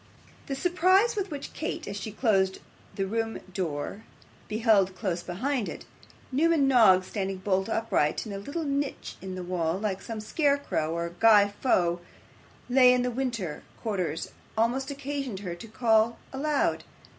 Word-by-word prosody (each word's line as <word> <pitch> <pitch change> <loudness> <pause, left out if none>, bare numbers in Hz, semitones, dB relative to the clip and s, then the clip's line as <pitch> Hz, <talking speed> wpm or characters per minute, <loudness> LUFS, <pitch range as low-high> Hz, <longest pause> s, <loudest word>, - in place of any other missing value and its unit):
The 275 - -2
surprise 365 - +3
with 400 -2 -2
which 290 -3 -6
Kate, 315 - -4
as 200 - -4
she 210 +1 -5
closed 195 -4 +2 0.4
the 195 - -1
room 225 +2 -2 0.2
door, 170 +3 -3 0.4
beheld, 210 -4 +3
close 180 -3 -2
beside 230 +7 -2
it, - - -8 0.5
Newman 305 +1 +3
Noggs 215 -8 +6
standing 195 -1 -3
bolt 190 +1 0
upright 225 -9 0
in 210 - -6
a 195 - -4
little 285 +11 -4
niche 280 -1 -2
in 190 -1 -6
the 185 - -5
wall 175 -1 -1
like 195 -2 -2
some 225 -2 -6
scarecrow 280 - 0
or 170 0 -2
Guy 210 -3 +6
Faux 175 -8 +2 0.7
laid 250 -1 +6
up - - -1
in - - -9
winter 230 - -2 0.2
quarters, 185 -8 -2 0.3
almost 250 +5 +1
occasioned 275 -6 -4
her 180 -4 -4
to 175 +7 -9
call 225 0 +2 0.2
aloud. 290 +1 0
220 Hz, 155 wpm, -28 LUFS, 190-270 Hz, 0.7 s, Noggs